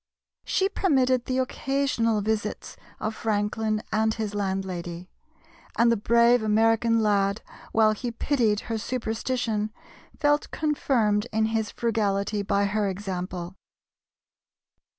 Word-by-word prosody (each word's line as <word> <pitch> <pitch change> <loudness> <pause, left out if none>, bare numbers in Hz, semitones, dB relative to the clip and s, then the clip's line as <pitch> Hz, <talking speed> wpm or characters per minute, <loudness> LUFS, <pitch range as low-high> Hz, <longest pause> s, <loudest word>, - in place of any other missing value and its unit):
She 385 - +1
permitted 260 - +2
the 255 - -1
occasional 260 -4 0
visits 215 0 -3 0.2
of 215 - -2
Franklin 215 0 -1
and 220 +1 +2
his 220 -2 -3
landlady; 185 -3 -4 0.7
and 235 +1 +5
the - - +4
brave 235 +3 +4
American 225 +1 +3
lad, 200 0 +1 0.3
while 220 -1 +4
he 225 +3 -3
pitied 230 -3 +1
her 225 -2 -3
superstition, 225 -2 -2 0.5
felt 295 -1 +2
confirmed 240 -9 +1
in 220 0 +2
his 220 -1 0
frugality 205 -3 0
by 200 0 +1
her 205 +1 0
example. 185 -2 -5
220 Hz, 110 wpm, -26 LUFS, 205-235 Hz, 0.7 s, and